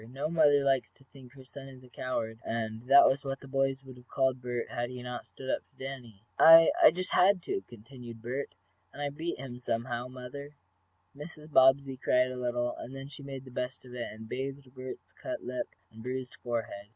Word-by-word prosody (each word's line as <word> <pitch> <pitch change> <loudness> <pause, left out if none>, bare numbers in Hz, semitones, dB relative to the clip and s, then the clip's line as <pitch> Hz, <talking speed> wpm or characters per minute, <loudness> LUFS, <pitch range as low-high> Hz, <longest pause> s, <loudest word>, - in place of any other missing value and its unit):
No 140 +4 -3
mother 150 -4 +5
likes 135 -2 +2
to 135 - -22
think 130 -2 -15
her 135 -1 -13
son 135 0 -10
a - - -15
coward, 115 -2 -3
and 110 -1 -3
that 140 - +9
was 140 +1 +1
what 135 -1 -3
the 140 - -12
boys 135 0 +1
would 130 -1 -11
have 125 0 -17
called 130 -2 +1
Bert 120 -1 -3
had 120 -1 -2
he 125 -1 -7
not 125 0 -6
stood 130 - -11
up - - +1
to - - -37
Danny. 125 -6 -8 0.2
"I 165 0 +10
I - - +10
just 185 +3 -3
had 185 -1 +4
to!" 390 0 -2
continued 120 +1 -11
Bert. 120 -4 -4 0.4
"And - - -12
I 145 0 -1
beat 160 +4 -3
him, 125 -2 -7
anyhow, 120 +1 -1
mother." 130 +3 -9 0.6
Mrs. 150 +1 -10
Bobbsey 135 0 +5
cried 125 0 +2
a - - -5
little, 120 -1 -1
and 130 - -8
then 135 +1 -7
she 145 0 -9
made 135 -1 -7
the 130 - -11
best 125 +1 -4
of 125 - -12
it, 120 -1 -4
and 110 +1 -10
bathed 135 +1 -5
Bert's 130 -1 -8
cut 315 -1 -6
lip 125 0 -3 0.2
and 110 0 -12
bruised 125 +1 -4
forehead. 115 -4 -4
130 Hz, 210 wpm, -30 LUFS, 120-140 Hz, 0.6 s, I